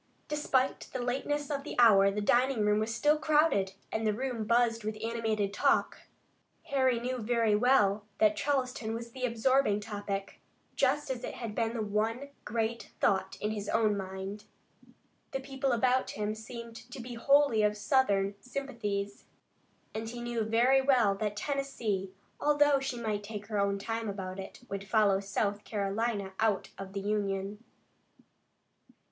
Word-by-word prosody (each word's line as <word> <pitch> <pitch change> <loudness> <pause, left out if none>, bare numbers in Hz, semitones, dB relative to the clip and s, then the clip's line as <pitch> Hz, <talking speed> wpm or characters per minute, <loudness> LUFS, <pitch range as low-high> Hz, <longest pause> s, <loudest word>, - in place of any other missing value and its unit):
Despite 275 -3 0
the 260 - -2
lateness 290 +4 -1
of 280 -1 -2
the 300 - -6
hour 200 -5 +7
the 205 +1 -2
dining 245 +3 +3
room 210 0 +3
was 220 +1 -1
still 295 +7 +2
crowded, 300 -12 +3 0.2
and 220 0 -1
the 210 - +1
room 245 -2 -3
buzzed 230 0 +2
with 215 0 -3
animated 220 -3 -1
talk. - - +2 0.6
Harry 260 -3 +2
knew 250 +1 -3
very 230 -1 +2
well 210 -3 +3
that 215 -1 +4
Charleston 255 -4 -1
was 235 0 -6
the 255 +1 -3
absorbing 235 -2 +2
topic, 205 -2 -5 0.3
just 295 -2 +1
as 255 -1 -4
it - - -5
had 230 -3 -5
been 225 +1 -1
the 225 - -1
one 220 +6 -1 0.2
great 225 +1 -2
thought 190 -1 +1
in 210 - -1
his 205 -1 -4
own 215 -2 +2
mind. 190 +1 -6 0.9
The 270 - -1
people 270 0 -2
about 255 +2 +2
him 210 0 -2
seemed 230 +1 -8
to 255 - -7
be 245 0 -7
wholly 275 -1 +4
of 210 0 +2
Southern 205 -3 +2
sympathies, 215 -7 -4 0.7
and 220 +1 -4
he 240 +1 -7
knew 240 -1 -2
very 235 +5 +4
well 250 -7 +4
that 205 +1 -2
Tennessee, 225 -8 -2 0.3
although 290 -1 +4
she 270 -3 -3
might 215 -3 -2
take 210 0 -6
her 210 -2 0
own 200 0 +1
time 225 +2 -3
about 190 -1 -5
it, 190 - -8
would 195 0 -5
follow 210 -3 +4
South 200 +1 -1
Carolina 200 -1 -2
out 220 -3 +1
of 195 0 -7
the 200 - -3
Union. 200 0 -2
225 Hz, 160 wpm, -31 LUFS, 205-255 Hz, 0.9 s, hour